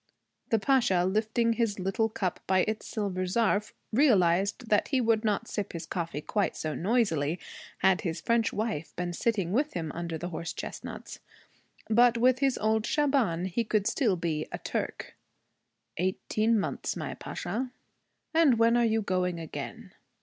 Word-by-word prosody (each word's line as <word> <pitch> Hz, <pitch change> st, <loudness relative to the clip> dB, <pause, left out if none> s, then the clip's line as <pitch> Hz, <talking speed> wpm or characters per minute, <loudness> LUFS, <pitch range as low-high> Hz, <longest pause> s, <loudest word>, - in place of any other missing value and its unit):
The 225 Hz, -, +3 dB
Pasha, 220 Hz, -7 st, +3 dB
lifting 220 Hz, +4 st, +1 dB
his 225 Hz, -3 st, 0 dB
little 195 Hz, +4 st, 0 dB
cup 190 Hz, -4 st, -2 dB
by 190 Hz, 0 st, +4 dB
its 215 Hz, 0 st, -3 dB
silver 195 Hz, -4 st, -2 dB
zarf, 210 Hz, +1 st, +1 dB, 0.2 s
realized 200 Hz, -, +3 dB
that 210 Hz, -, +3 dB
he 270 Hz, -, +1 dB
would 225 Hz, -2 st, +2 dB
not 215 Hz, +1 st, 0 dB
sip 205 Hz, -, -4 dB
his 170 Hz, -, -5 dB
coffee 165 Hz, -4 st, -3 dB
quite 205 Hz, +5 st, -1 dB
so 155 Hz, -1 st, -3 dB
noisily 175 Hz, -7 st, +1 dB, 0.4 s
had 190 Hz, -2 st, +4 dB
his 165 Hz, -3 st, -3 dB
French 230 Hz, -1 st, +1 dB
wife 210 Hz, -8 st, -3 dB
been 175 Hz, 0 st, -3 dB
sitting 195 Hz, -3 st, 0 dB
with 285 Hz, +8 st, +1 dB
him 160 Hz, -3 st, -3 dB
under 170 Hz, -1 st, -4 dB
the 175 Hz, +3 st, -5 dB
horse 165 Hz, -1 st, -5 dB
chestnuts. -, -, -7 dB, 0.7 s
But 235 Hz, +1 st, +5 dB
with 250 Hz, +1 st, +4 dB
his 270 Hz, -2 st, +2 dB
old 220 Hz, 0 st, +1 dB
Shaban 265 Hz, -, +1 dB
he 190 Hz, +5 st, -1 dB
could 215 Hz, -2 st, 0 dB
still 230 Hz, -3 st, +2 dB
be 160 Hz, -3 st, -2 dB
a -, -, -3 dB
Turk. -, -, -4 dB, 0.8 s
'Eighteen 215 Hz, +5 st, +1 dB
months, 195 Hz, -, -2 dB
my -, -, -4 dB
Pasha.' 255 Hz, +2 st, -4 dB, 0.6 s
'And 315 Hz, -7 st, +5 dB
when 230 Hz, +1 st, +4 dB
are 240 Hz, -, +4 dB
you 220 Hz, -1 st, +1 dB
going 180 Hz, -2 st, 0 dB
again?' 160 Hz, -2 st, -7 dB
210 Hz, 160 wpm, -29 LUFS, 180-230 Hz, 0.8 s, But